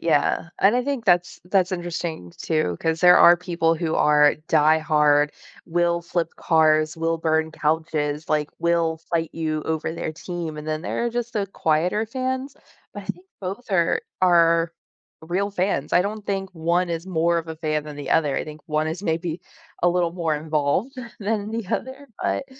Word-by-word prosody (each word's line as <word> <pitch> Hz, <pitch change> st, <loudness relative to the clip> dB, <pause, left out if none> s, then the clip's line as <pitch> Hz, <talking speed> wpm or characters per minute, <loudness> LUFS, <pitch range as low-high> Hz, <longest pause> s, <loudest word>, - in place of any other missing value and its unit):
yeah. 165 Hz, +1 st, +1 dB
And 200 Hz, +5 st, +5 dB
I 250 Hz, -, 0 dB
think 280 Hz, -5 st, -2 dB
that's 175 Hz, -1 st, +2 dB
that's 185 Hz, 0 st, +1 dB
interesting 170 Hz, -, -4 dB
too, 155 Hz, -, -1 dB
'cause 160 Hz, 0 st, -1 dB
there 180 Hz, 0 st, +8 dB
are 175 Hz, 0 st, +8 dB
people 170 Hz, -2 st, 0 dB
who 160 Hz, -1 st, -2 dB
are 150 Hz, -1 st, +5 dB
diehard, 150 Hz, -1 st, +4 dB, 0.3 s
will 170 Hz, 0 st, 0 dB
flip 170 Hz, -1 st, -1 dB
cars, 155 Hz, -1 st, +3 dB
will 165 Hz, 0 st, 0 dB
burn 160 Hz, -1 st, 0 dB
couches, 155 Hz, -1 st, -1 dB
like, 150 Hz, -1 st, 0 dB
will 170 Hz, -1 st, +1 dB
fight 165 Hz, -1 st, 0 dB
you 155 Hz, -2 st, -2 dB
over 160 Hz, 0 st, -2 dB
their 160 Hz, -, -4 dB
team, 165 Hz, -2 st, -6 dB
and 150 Hz, +1 st, -7 dB
then 155 Hz, 0 st, -2 dB
there 235 Hz, -, -2 dB
are -, -, -1 dB
just 240 Hz, 0 st, -3 dB
the 205 Hz, -2 st, -1 dB
quieter 180 Hz, +4 st, 0 dB
fans. 260 Hz, +3 st, -3 dB, 0.4 s
But -, -, -8 dB
I -, -, -17 dB
think 370 Hz, -, -6 dB
both 195 Hz, +6 st, -6 dB
are 170 Hz, -3 st, +2 dB, 0.2 s
are 170 Hz, -2 st, +4 dB, 0.5 s
real 185 Hz, +5 st, -1 dB
fans. 195 Hz, 0 st, -1 dB
I 180 Hz, -, +5 dB
don't 210 Hz, +1 st, -5 dB
think 195 Hz, -1 st, -2 dB
1 170 Hz, +2 st, 0 dB
is 170 Hz, +2 st, -4 dB
more 170 Hz, -1 st, +1 dB
of 165 Hz, 0 st, -6 dB
a 160 Hz, -, -6 dB
fan 155 Hz, -1 st, -1 dB
than 150 Hz, -1 st, -8 dB
the 145 Hz, -, -6 dB
other, 150 Hz, -4 st, +2 dB
I -, -, -1 dB
think 155 Hz, 0 st, -10 dB
1 155 Hz, 0 st, 0 dB
is 170 Hz, +5 st, -5 dB
maybe 165 Hz, -1 st, -2 dB, 0.4 s
a 175 Hz, -, +5 dB
little 175 Hz, -1 st, +1 dB
more 165 Hz, -4 st, -1 dB
involved 155 Hz, -, -1 dB, 0.3 s
than 210 Hz, 0 st, -2 dB
the 225 Hz, -2 st, -4 dB
other, 265 Hz, +2 st, -6 dB
but, -, -, -1 dB
165 Hz, 185 wpm, -23 LUFS, 155-185 Hz, 0.5 s, there